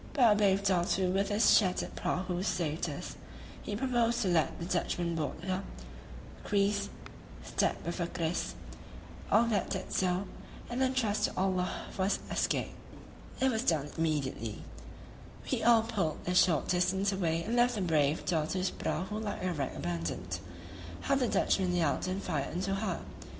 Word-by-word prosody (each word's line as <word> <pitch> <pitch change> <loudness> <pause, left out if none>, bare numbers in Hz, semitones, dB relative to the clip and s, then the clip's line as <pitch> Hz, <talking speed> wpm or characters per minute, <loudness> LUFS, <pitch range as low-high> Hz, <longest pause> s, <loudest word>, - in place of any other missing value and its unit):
But 245 -6 +6
a - - +5
brave 200 -1 +3
Datoo 185 -1 +2
with 195 +1 +1
his 210 +2 +5
shattered 185 -4 +1
prahus 180 0 -1
saved 160 -3 -1
us; - - -6 0.5
he 205 - -4
proposed 235 0 +1
to 190 - +1
let 160 -5 +2
the 170 - -5
Dutchmen 175 -1 -1
board 155 -3 -3
her, 185 0 -1 0.8
creese 200 0 +1 0.5
[stab - - +1
with 170 +2 -3
a 170 - 0
kris] 170 -1 -2 0.8
all 225 - +6
that 225 -3 0
did 190 -1 -4
so, 185 +1 +1 0.5
and 245 +2 -1
then 260 0 +2
trust 215 -5 +1
to - - -4
Allah 185 -1 0
for 190 - -1
his 200 - +2
escape. - - 0 0.7
It 265 0 +3
was 220 -2 0
done 150 - +1
immediately; 140 -9 -2 0.9
we - - +1
all 230 -1 +6
pulled 200 -9 -1
a 180 - 0
short 175 -5 +4
distance 190 +2 +2
away 170 -4 0
and 225 +5 -2
left 245 0 +4
the 205 - -2
brave 155 -4 +2
Datoo's 180 +3 0
prahu 210 +4 -3
like 205 -4 -4
a 185 -1 0
wreck 140 -4 -3
abandoned. 85 +1 -3 0.6
How - - 0
the 265 -3 +2
Dutchmen 185 -4 +2
yelled 175 +1 +1
and 190 +2 -2
fired 155 -3 -2
into 190 +2 -1
her! 195 -3 -2
185 Hz, 165 wpm, -31 LUFS, 170-210 Hz, 0.9 s, But